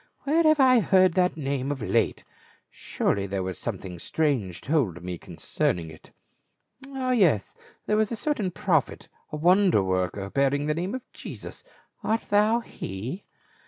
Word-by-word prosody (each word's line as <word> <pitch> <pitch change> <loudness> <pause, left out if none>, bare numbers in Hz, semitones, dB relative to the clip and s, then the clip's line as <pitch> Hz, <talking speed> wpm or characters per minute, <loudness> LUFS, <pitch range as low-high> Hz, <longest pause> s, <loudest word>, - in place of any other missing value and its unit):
" - - -40
Where 310 +4 +2
have 310 -2 +4
I 255 -2 +6
heard 185 -2 +4
that 180 -2 +1
name 140 -2 -2
of 135 -5 -4
late? - - 0 0.5
Surely 100 0 -1
there 95 -1 -2
was 95 -1 -5
something 90 -2 -5
strange 125 - -1
told 120 - 0
me 90 -1 -5
concerning 80 -2 -2
it. 80 - -15 0.8
Ah 265 -2 -2
yes, 175 - +2 0.3
there 210 - +1
was 215 0 +1
a - - -1
certain 220 -4 -1
prophet, - - -1 0.2
a 150 - -4
wonder 180 - +4
worker 95 +1 -2
bearing 140 +1 +1
the 150 - +1
name 180 +8 -3
of 260 - -6
Jesus; - - -9 0.4
art 225 +2 -1
thou 215 +3 +4
he?" 120 - -6
150 Hz, 160 wpm, -26 LUFS, -, 0.8 s, I